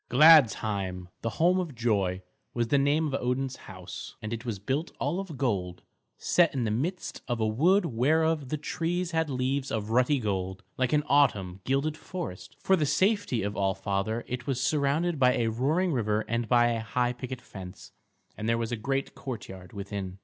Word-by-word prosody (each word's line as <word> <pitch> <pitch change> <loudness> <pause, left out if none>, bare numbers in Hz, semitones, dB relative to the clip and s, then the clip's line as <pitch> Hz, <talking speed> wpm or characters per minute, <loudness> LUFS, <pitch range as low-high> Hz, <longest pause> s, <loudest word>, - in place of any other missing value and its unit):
Gladsheim, 110 - +5
the 115 - -1
home 180 +3 +4
of 170 -7 -4
joy, 100 -6 0 0.3
was 120 -1 0
the 140 - +4
name 145 +3 +2
of 145 - -3
Odin's 130 +1 -1
house, 95 -2 -8
and 110 +1 -5
it 115 0 -5
was 115 -5 -3
built 135 - -2
all 150 +7 -1
of 185 -7 -6
gold, 95 -9 -2 0.3
set 170 -5 +3
in 130 - 0
the 110 - 0
midst 165 - -3
of 120 -2 -1
a 110 - +1
wood 170 - +3
whereof 155 +3 +1
the 155 - -1
trees 170 +3 -2
had 160 -2 0
leaves 130 +1 -1
of 110 0 -3
ruddy 125 +4 +3
gold 95 -5 -3
like 130 -1 0
an 150 -1 +3
autumn 105 -11 +2
gilded 140 +4 0
forest. 175 - -7
For 190 - +3
the 155 -5 0
safety 190 - +1
of 100 +1 -3
All 95 -1 +1
Father 100 +4 -2
it 125 -1 -5
was 135 -3 0
surrounded 150 +4 +1
by 125 -1 +5
a 115 -1 +1
roaring 155 +10 +1
river 110 -3 0
and 115 0 -1
by 120 -1 +5
a 115 -1 0
high 120 +2 0
picket 130 0 -6
fence; 90 -5 -10 0.4
and 110 +1 -3
there 115 - +2
was 115 0 -2
a 120 - -1
great 135 +5 -2
courtyard 95 -8 -8
within. 100 -2 -5
125 Hz, 190 wpm, -28 LUFS, 110-150 Hz, 0.4 s, Gladsheim